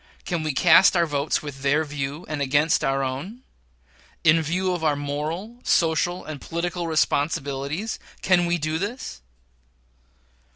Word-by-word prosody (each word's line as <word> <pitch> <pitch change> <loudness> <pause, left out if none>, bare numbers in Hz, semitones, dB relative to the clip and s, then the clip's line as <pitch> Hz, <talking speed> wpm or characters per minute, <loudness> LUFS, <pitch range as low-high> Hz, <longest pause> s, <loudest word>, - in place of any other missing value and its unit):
Can 175 -2 -2
we 155 -1 -1
cast 175 +7 +6
our 170 - +4
votes 145 -1 -1
with 140 -2 -8
their 140 +3 +2
view, 145 +2 -5
and 150 -2 -3
against 145 +4 +2
our 135 0 +1
own? 150 - -5 0.8
In 165 0 +5
view 180 +4 -1
of 175 -2 -4
our 150 -2 +2
moral, 155 +11 -4
social, 165 0 +1
and 155 -3 -7
political 170 +1 -3
responsibilities, 150 +3 -1 0.2
can 175 -2 +3
we 175 0 +1
do 155 0 -2
this? 205 - -5
155 Hz, 140 wpm, -24 LUFS, 145-175 Hz, 0.8 s, cast